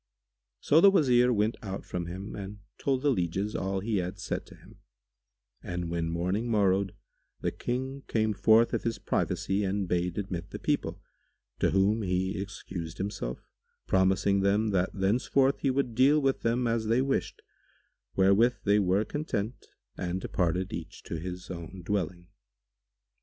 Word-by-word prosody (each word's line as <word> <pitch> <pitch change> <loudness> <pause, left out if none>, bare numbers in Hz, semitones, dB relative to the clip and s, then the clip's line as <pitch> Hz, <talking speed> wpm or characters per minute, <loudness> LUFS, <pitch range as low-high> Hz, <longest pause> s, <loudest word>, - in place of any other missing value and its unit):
So 155 +3 +5
the 200 - +9
Wazir 125 -9 +4
went 110 0 +1
out 95 -3 -5
from 85 -1 -4
him 95 +4 -6
and 100 +1 -7 0.2
told 135 -1 0
the 145 - +4
lieges 95 0 -1
all 95 0 -1
he 110 +1 0
had 90 +1 -2
said - - -4
to - - -13
him; - - -18 0.8
and, 85 -1 -4
when 85 -1 -1
morning 90 +8 -1
morrowed, 100 -3 +2 0.5
the - - 0
King 130 +3 -3
came 110 -1 +1
forth 110 +4 +4
of - - +1
his 115 -2 -2
privacy 100 0 -1
and 95 0 -1
bade 90 0 -1
admit 95 -4 -4
the - - -6
people, - - -1 0.6
to - - +3
whom 100 +3 +2
he 95 0 -1
excused 90 -4 -6
himself, 95 - -4 0.4
promising 95 +1 +3
them 100 +3 +2
that 95 -2 +1
thenceforward 125 +7 +2
he 140 - +1
would 130 -2 0
deal 135 +6 +5
with 135 -2 +1
them 120 +2 +1
as 115 -1 0
they 120 +4 +3
wished, 135 0 -1 0.8
wherewith 100 +6 +4
they 105 0 +4
were 100 +2 +2
content 125 -6 -3 0.3
and 90 0 -2
departed 90 +2 -1
each 85 +3 -7
to 85 - -5
his 90 +2 -6
own 90 +1 -8
dwelling. 90 -3 -2
100 Hz, 160 wpm, -29 LUFS, 90-115 Hz, 0.8 s, the